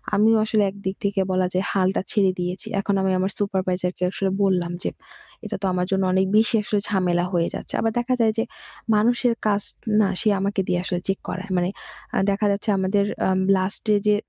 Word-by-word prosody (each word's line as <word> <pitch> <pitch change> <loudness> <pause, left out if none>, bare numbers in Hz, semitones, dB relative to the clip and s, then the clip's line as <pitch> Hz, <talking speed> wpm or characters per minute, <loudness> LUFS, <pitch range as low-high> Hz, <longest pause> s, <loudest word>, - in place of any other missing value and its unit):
আমিও 220 +2 +5
আসলে 215 -1 +2
একদিক 195 -1 -5
থেকে 200 -1 +1
বলা 185 0 +2
যে, 185 - +2
হালটা 190 -1 +1
ছেড়ে 195 -3 +3
দিয়েছি। 180 +4 -4
এখন 200 0 0
আমি 190 0 +1
আমার 190 +2 0
সুপারভাইজার 185 -3 -1
কে - - -4
আসলে 195 0 -1
বললাম 180 -3 +1
যে, - - 0 0.6
এটা - - -4
তো - - +1
আমার 180 0 0
জন্য 195 0 +2
অনেক 190 +1 +3
বেশি 225 +1 +3
আসলে 210 0 0
ঝামেলা 180 -3 +1
হয়ে 170 -1 +2
যাচ্ছে। - - -7
আবার 225 - +1
দেখা 240 +2 0
যায় 220 -1 +3
যে, 225 - +2 0.5
মানুষের 240 +3 +3
কাজ 205 -1 +2 0.4
না 200 - +3
সে 220 - +3
আমাকে 195 0 0
দিয়ে 180 -1 +1
আসলে 180 -1 -2
চেক 195 0 0
করায় 185 +2 -5
মানে 175 0 +1 0.5
আ - - +1
দেখা 205 +2 0
যাচ্ছে 200 +2 -2
আমাদের 195 +1 +1 0.2
আ - - +2 0.3
লাস্টে 205 +3 0
যে, 210 - +5
195 Hz, 200 wpm, -23 LUFS, 185-210 Hz, 0.6 s, আমিও